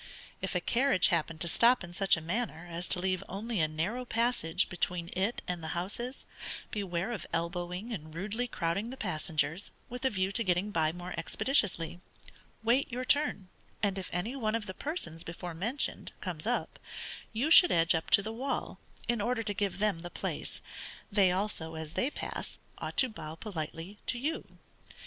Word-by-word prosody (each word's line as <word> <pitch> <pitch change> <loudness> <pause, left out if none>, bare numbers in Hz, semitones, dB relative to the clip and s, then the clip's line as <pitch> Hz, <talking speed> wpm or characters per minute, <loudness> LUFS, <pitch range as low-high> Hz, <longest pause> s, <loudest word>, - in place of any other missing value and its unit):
If - - -2
a - - +2
carriage 260 -4 +4
happen 165 -1 +1
to 170 - +1
stop 235 +6 +5
in 175 0 -8
such 195 -1 +4
a - - -5
manner 175 -1 -2
as 170 +1 -3
to - - +3
leave 185 0 0
only 215 +2 -2
a 155 - +4
narrow 175 +11 -2
passage 230 -8 +1
between 175 -1 -1
it 195 +6 0
and 175 -2 -3
the 160 +2 -3
houses, 235 +9 -4 0.5
beware 195 0 -2
of 220 - -4
elbowing 175 +6 -2
and 155 -6 -6
rudely 215 +7 -1
crowding 195 +1 -1
the 260 - -6
passengers, 160 - -1 0.2
with 245 +1 -6
a 265 - +4
view 190 -4 0
to 230 - +2
getting 185 +1 +1
by 160 -5 +2
more 175 +1 -6
expeditiously: 175 - +2 0.6
wait 245 +5 +3
your 250 +2 -2
turn, 255 -10 +3 0.3
and 200 -1 +2
if 185 - -6
any 210 +9 -1
one 220 -4 0
of 225 -2 -2
the 190 - -5
persons 185 - -3
before 170 0 -6
mentioned 225 - -1
comes - - -4
up, - - -1 0.5
you 250 +8 0
should 355 +1 +10
edge 165 -1 +5
up 160 -1 -1
to 200 - +7
the 220 +2 -4
wall, 265 +4 -3 0.3
in 235 -2 +1
order 235 +2 0
to 205 -1 -2
give 200 -1 -1
them 205 -4 +1
the 175 +1 -6
place. - - -4 0.5
They 200 -3 +5
also, 180 -4 +1
as 160 0 -5
they 255 - +1
pass, - - -5 0.2
ought - - -5
to 260 - +6
bow 155 -8 -7
politely 170 0 -6
to 245 - +2
you. 300 +7 -3
195 Hz, 185 wpm, -31 LUFS, 170-230 Hz, 0.6 s, should